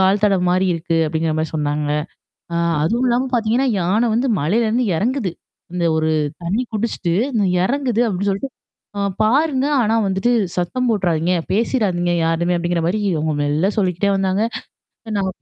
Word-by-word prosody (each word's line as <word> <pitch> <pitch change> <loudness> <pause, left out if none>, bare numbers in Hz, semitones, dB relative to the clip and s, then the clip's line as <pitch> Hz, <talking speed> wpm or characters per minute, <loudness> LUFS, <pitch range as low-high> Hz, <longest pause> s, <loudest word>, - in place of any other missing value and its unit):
கால் 195 +2 +3
தடம் 195 -3 +2
மாரி 185 +1 +2
இருக்கு. 165 0 -2
அப்பிடிங்கிற 160 +1 -1
மாரி 160 0 -1
சொன்னாங்க. 150 0 -1 0.7
ஆ - - 0 0.3
அதுவும் 235 +11 +1
இல்லாம 245 +2 +1
பாத்தீங்கன்னா, 235 +3 +1
யானை 200 +7 +2
வந்து 250 +4 +1
மலையிலருந்து 220 - +1
எறங்குது. 230 - 0 0.4
இந்த 180 -1 -1
ஒரு 160 0 +1 0.3
தண்ணீ 195 +8 0
குடிச்சுட்டு, 215 -5 -2 0.3
ந - - +2 0.2
எறங்குது 250 -1 0
அப்பிடி 200 0 -1
சொல்லிட்டு 200 +8 -3 0.5
அ - - -1 0.2
"பாருங்க. 270 +4 +2 0.2
ஆனா 220 0 +1
வந்துட்டு 195 +6 +1 0.2
சத்தம் 245 +8 -1
போட்டுறாதீங்க, 180 -4 +1 0.2
பேசிறாதீங்க 195 -5 +1
யாருமே" 170 +2 +1
அப்பிடிங்கிற 175 0 -1
மாரி 200 +5 0
இவுங்க 155 -2 -1
மெல்ல 150 +7 +1
சொல்லிக்கிட்டே 190 0 +1
வந்தாங்க. 195 +1 0 0.6
இத 220 - -5
நான் 190 -1 0
190 Hz, 150 wpm, -19 LUFS, 170-230 Hz, 0.7 s, கால்